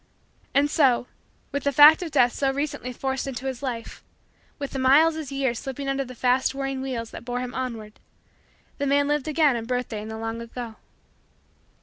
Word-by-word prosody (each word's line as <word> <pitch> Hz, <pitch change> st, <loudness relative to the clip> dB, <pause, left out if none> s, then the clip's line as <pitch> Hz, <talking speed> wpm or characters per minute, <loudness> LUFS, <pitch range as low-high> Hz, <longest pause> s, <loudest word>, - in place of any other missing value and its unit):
And 285 Hz, +1 st, +4 dB
so, 260 Hz, -6 st, +3 dB, 0.5 s
with 280 Hz, -1 st, -2 dB
the 280 Hz, -, +2 dB
fact 295 Hz, +4 st, +8 dB
of 350 Hz, -, -3 dB
Death 245 Hz, -5 st, +3 dB
so 275 Hz, -1 st, 0 dB
recently 285 Hz, -2 st, -3 dB
forced 265 Hz, +2 st, -3 dB
into 265 Hz, -1 st, -5 dB
his 260 Hz, -1 st, -4 dB
life, 240 Hz, -4 st, -5 dB, 0.5 s
with 280 Hz, -2 st, -5 dB
the 270 Hz, -, -4 dB
miles 295 Hz, +5 st, +5 dB
as 310 Hz, -3 st, -6 dB
years 265 Hz, -4 st, -1 dB
slipping 275 Hz, +1 st, -5 dB
under 275 Hz, 0 st, 0 dB
the 255 Hz, -1 st, -10 dB
fast 255 Hz, +2 st, +1 dB
whirring 270 Hz, -1 st, -3 dB
wheels 245 Hz, -4 st, -4 dB
that -, -, -9 dB
bore 245 Hz, +1 st, -3 dB
him 250 Hz, 0 st, -5 dB
onward, 230 Hz, -5 st, -5 dB, 0.8 s
the 280 Hz, -, 0 dB
man 285 Hz, +1 st, +3 dB
lived 295 Hz, -1 st, 0 dB
again 300 Hz, -3 st, +3 dB
a 235 Hz, -, -2 dB
birthday 240 Hz, -2 st, -3 dB
in 215 Hz, -, -7 dB
the 220 Hz, 0 st, -6 dB
long 225 Hz, +1 st, -4 dB
ago. 235 Hz, -1 st, -7 dB
265 Hz, 195 wpm, -25 LUFS, 245-280 Hz, 0.8 s, fact